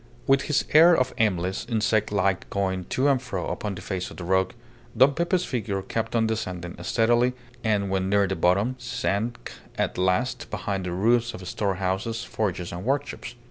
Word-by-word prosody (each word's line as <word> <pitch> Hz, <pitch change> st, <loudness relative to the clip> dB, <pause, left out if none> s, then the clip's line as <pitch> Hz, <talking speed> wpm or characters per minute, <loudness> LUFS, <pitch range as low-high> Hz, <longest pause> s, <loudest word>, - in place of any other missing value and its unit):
With 135 Hz, 0 st, +4 dB
his 150 Hz, -, +2 dB
air 165 Hz, +3 st, +8 dB
of 130 Hz, 0 st, +1 dB
aimless, 95 Hz, -4 st, +1 dB
insect 110 Hz, -1 st, +1 dB
like 95 Hz, -2 st, 0 dB
going 95 Hz, -2 st, -1 dB
to 135 Hz, +3 st, 0 dB
and 135 Hz, -3 st, +3 dB
fro 125 Hz, -1 st, -4 dB
upon 105 Hz, -3 st, -3 dB
the 95 Hz, -, -9 dB
face 95 Hz, -2 st, -3 dB
of -, -, -12 dB
the 90 Hz, -, -6 dB
rock, 95 Hz, +4 st, +1 dB, 0.4 s
Don 130 Hz, +4 st, +6 dB
Pepe's 175 Hz, +3 st, 0 dB
figure 100 Hz, -6 st, -2 dB
kept 115 Hz, +3 st, -3 dB
on 115 Hz, -1 st, +3 dB
descending 90 Hz, -6 st, -3 dB
steadily, 120 Hz, +5 st, +2 dB, 0.3 s
and, 105 Hz, -3 st, +1 dB
when 95 Hz, 0 st, 0 dB
near 100 Hz, 0 st, +4 dB
the 95 Hz, -, -2 dB
bottom, 100 Hz, +10 st, +2 dB
sank 120 Hz, -1 st, -2 dB, 0.3 s
at -, -, -1 dB
last 95 Hz, +7 st, 0 dB
behind 95 Hz, -3 st, -3 dB
the -, -, -3 dB
roofs 115 Hz, +6 st, +2 dB
of 95 Hz, -, -9 dB
store 100 Hz, 0 st, -1 dB
houses, 100 Hz, +5 st, -2 dB
forges, 90 Hz, -8 st, -3 dB
and 85 Hz, +1 st, -6 dB
workshops. 125 Hz, -1 st, -2 dB
105 Hz, 180 wpm, -25 LUFS, 95-120 Hz, 0.4 s, air